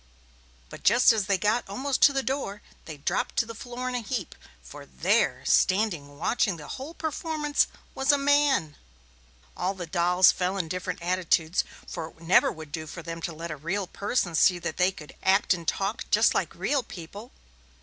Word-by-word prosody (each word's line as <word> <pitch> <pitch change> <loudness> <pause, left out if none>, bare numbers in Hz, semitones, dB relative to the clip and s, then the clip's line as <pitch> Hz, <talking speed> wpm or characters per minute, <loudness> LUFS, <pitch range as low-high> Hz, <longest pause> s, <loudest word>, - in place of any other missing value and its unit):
But - - -10
just 240 0 +6
as 210 -4 -1
they 200 -2 +2
got 210 +3 0
almost 260 +7 -2
to 285 - +8
the 270 -1 -1
door, 260 -7 -3 0.2
they 155 -2 -8
dropped 140 - -2
to 230 - +3
the 230 - -8
floor 245 +3 -6
in 255 - -2
a 250 - 0
heap, 230 -5 -4 0.3
for - - -11
there, 65 -1 0
standing 175 -8 +1
watching 200 +2 0
the 150 - -10
whole 285 +6 -7
performance, 310 -2 0 0.3
was 270 +2 +2
a 285 - +3
man. 280 - +2 0.8
All 185 +2 -2
the 180 -2 -5
dolls 180 +2 +4
fell 185 +2 -2
in 180 -4 -2
different 180 0 -4
attitudes, 175 -1 +1 0.2
for 165 -3 -5
it - - -16
would 165 0 -14
never 180 - +5
do 155 +2 -6
for 170 +2 -8
them 165 0 -6
to 170 - -3
let 165 +1 -7
a - - -4
real 190 +7 -2
person 200 -1 -2
see 180 +2 +4
that 170 -2 -5
they 180 +1 +3
could 150 -5 -12
act 195 +1 +3
and 170 -2 -7
talk 195 +7 -1
just - - +4
like - - -1
real 285 -2 0
people. 205 +3 -10
190 Hz, 190 wpm, -27 LUFS, 165-245 Hz, 0.8 s, to